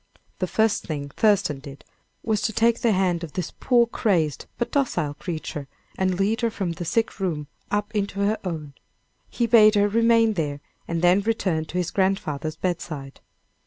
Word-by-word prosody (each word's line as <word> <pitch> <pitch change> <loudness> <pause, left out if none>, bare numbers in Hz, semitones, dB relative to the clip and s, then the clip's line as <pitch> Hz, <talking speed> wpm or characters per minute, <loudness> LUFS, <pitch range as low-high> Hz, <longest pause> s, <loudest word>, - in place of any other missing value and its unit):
The 185 - 0
first 220 +2 +1
thing 145 -4 -4
Thurston 200 -5 +2
did, 140 0 -11 0.4
was 215 -2 0
to 220 - 0
take 230 +1 +2
the 235 - +3
hand 185 -3 +1
of 160 - -7
this 180 -2 -3
poor 240 -2 +4
crazed, 175 - 0
but 240 - -2
docile 245 - 0
creature, 155 -3 -5 0.3
and 185 -1 0
lead 210 +4 +1
her 230 - +2
from 195 -5 -3
the 170 +1 -5
sick 225 +5 0
room 165 -6 -2 0.2
up 205 +1 -1
into 200 -1 -1
her 210 +2 +1
own. 155 -6 -5 0.6
He 240 - 0
bade 220 -2 +6
her 205 0 +4
remain 230 +1 +4
there, 145 -6 -2 0.3
and 170 0 -2
then 180 +3 +5
returned 185 -7 -1
to 180 - -4
his 175 -1 -1
grandfather's 160 -6 -1
bedside. 155 -6 -4
190 Hz, 175 wpm, -24 LUFS, 160-220 Hz, 0.6 s, bade